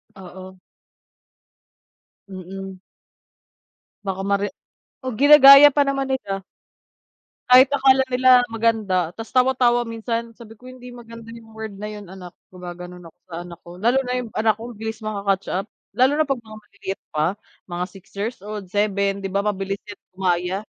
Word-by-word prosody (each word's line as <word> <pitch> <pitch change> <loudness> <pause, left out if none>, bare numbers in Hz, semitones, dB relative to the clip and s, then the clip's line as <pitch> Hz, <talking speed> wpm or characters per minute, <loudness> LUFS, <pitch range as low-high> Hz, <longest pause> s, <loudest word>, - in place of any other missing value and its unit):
Oo. 185 0 -12 1.7
Mm. 190 0 -9 1.2
Baka 195 -1 -4
mare 200 0 +1 0.5
o, 260 - -4
ginagaya 285 0 +9
pa 290 - +3
naman 275 -1 -1
nila. 195 -7 -3 1.1
Kahit 255 +1 +8
akala 265 -1 +4
nila 255 +1 +3 0.2
maganda 215 -7 0
tas 225 0 -9
tawa-tawa 250 -2 +3
minsan, 230 0 -4
sabi 225 -2 -13
ko 250 +3 -15
hindi 250 -1 -12
maganda 230 -1 -12
yung 225 -1 -14
word 220 -1 -7
na 210 - -6
yung 210 -2 -9
anak, 180 -2 -11 0.2
gumagano'n 180 0 -10
ako 165 +2 -19
sa 165 - -7
anak 170 -1 -11
ko, 170 - -11
lalo 240 +4 +3
na 250 - -3
yung 235 - -8
anak 220 0 +2
ko - - -8
bilis 220 +1 -6
maka-catch 200 -2 -2
up, 195 +3 -3 0.3
lalo 255 +2 +4
na 310 +1 +2
'pag 275 -2 -1
mga 215 -1 -12
maliliit 200 -1 -8
pa, 150 0 0 0.4
mga 175 0 -3
6 190 0 -15
years 220 +5 -3
old, 210 -2 -7
7 200 0 0
di 195 - -3
ba, 200 - 0
mabilis 195 -1 -3
yan 205 - -10
gumaya. 180 0 -1
210 Hz, 155 wpm, -22 LUFS, 190-240 Hz, 1.7 s, ginagaya